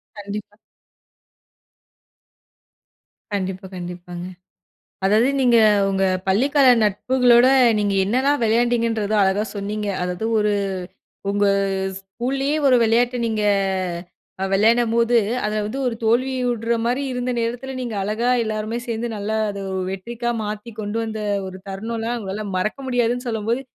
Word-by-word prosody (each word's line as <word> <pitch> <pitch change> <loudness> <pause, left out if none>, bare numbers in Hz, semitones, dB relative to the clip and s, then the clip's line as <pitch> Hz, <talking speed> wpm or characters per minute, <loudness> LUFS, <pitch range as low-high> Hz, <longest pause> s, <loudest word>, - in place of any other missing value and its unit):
கண்டிப்பா. 205 0 -7 2.8
கண்டிப்பா, 190 -1 -3
கண்டிப்பாங்க. 175 0 -7 0.8
அதாவது 220 +6 +4
நீங்க 240 -2 +5 0.3
உங்க 195 0 0 0.2
பள்ளி 210 +9 +3
கால 280 -3 +5 0.2
நட்புகளோட 245 +4 +4 0.3
நீங்க 205 -1 0
என்னலாம் 265 +6 +1
விளையாண்டீங்கன்றத 230 -2 +1
அழகா 190 +2 +2
சொன்னீங்க. 205 +1 -3
அதாவது 180 +4 -2
ஒரு 210 0 +2 0.8
உங்க 205 0 +1 0.5
ஸ்கூலயே 260 +9 -2
ஒரு 255 -2 +5
விளையாட்டு 240 +2 +2
நீங்க 215 -1 -1 1.0
அ, - - +1
விளையாடும்போது, 230 +3 +3 0.3
அதுல 215 0 -1
வந்து 260 +6 -4
ஒரு 230 - -2
தோல்வியுடற 240 -1 +1
மாதிரி 250 +4 0
இருந்த 250 0 -2
நேரத்துல 245 +3 -3
நீங்க 240 -4 -4
அழகா 215 +5 -1
எல்லாருமே 215 +1 -3
சேர்ந்து 235 0 -3
நல்லா 210 +2 -2
அத, 200 -1 -5
ஒ - - -2
வெற்றிக்கா 235 +5 -4
மாத்தி 210 +2 -5
கொண்டு 210 +1 -3
வந்த 220 -1 -4 0.3
ஒரு 185 0 -8
தருணம்லாம் 225 +4 -3
உங்களால 205 +1 -5
மறக்க 215 +8 -2
முடியாதுன்னு 245 0 0
சொல்லும்போது 225 +3 -1
225 Hz, 120 wpm, -21 LUFS, 205-240 Hz, 2.8 s, நீங்க